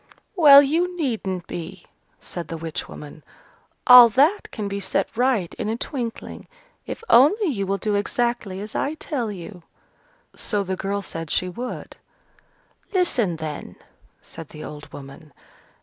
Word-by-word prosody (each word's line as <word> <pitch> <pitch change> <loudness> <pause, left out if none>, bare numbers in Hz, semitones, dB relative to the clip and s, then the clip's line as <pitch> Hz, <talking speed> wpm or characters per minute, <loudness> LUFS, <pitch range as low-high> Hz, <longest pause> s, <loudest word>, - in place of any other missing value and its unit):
"Well, 285 -5 +9
you 345 +6 0
needn't 205 - -2
be," 175 +2 -8 0.3
said 170 -3 -7
the 165 - -5
witch 160 -1 -5
woman. 150 +1 -11 0.6
"All 250 -2 +10
that 295 - +2
can 210 -3 -5
be 200 0 -4
set 195 -1 -2
right 240 -7 +1
in - - -2
a 225 - -2
twinkling: 240 -4 -6 0.4
if - - -6
only 325 - +5
you 200 -8 -2
will 195 +1 0
do 210 +2 -2
exactly 205 -1 -1
as 210 +1 -8
I 295 +3 -2
tell 250 -8 -3
you." 180 -1 -9 0.7
So 205 -2 -1
the 190 0 -3
girl 200 +2 -3
said 165 -3 -6
she 185 - 0
would. 245 +7 -7 0.9
"Listen, 250 - +1
then," 155 -2 -7 0.5
said 165 - -10
the 155 0 -10
old 150 -1 -10
woman. 140 +1 -12
205 Hz, 150 wpm, -23 LUFS, 175-255 Hz, 0.9 s, All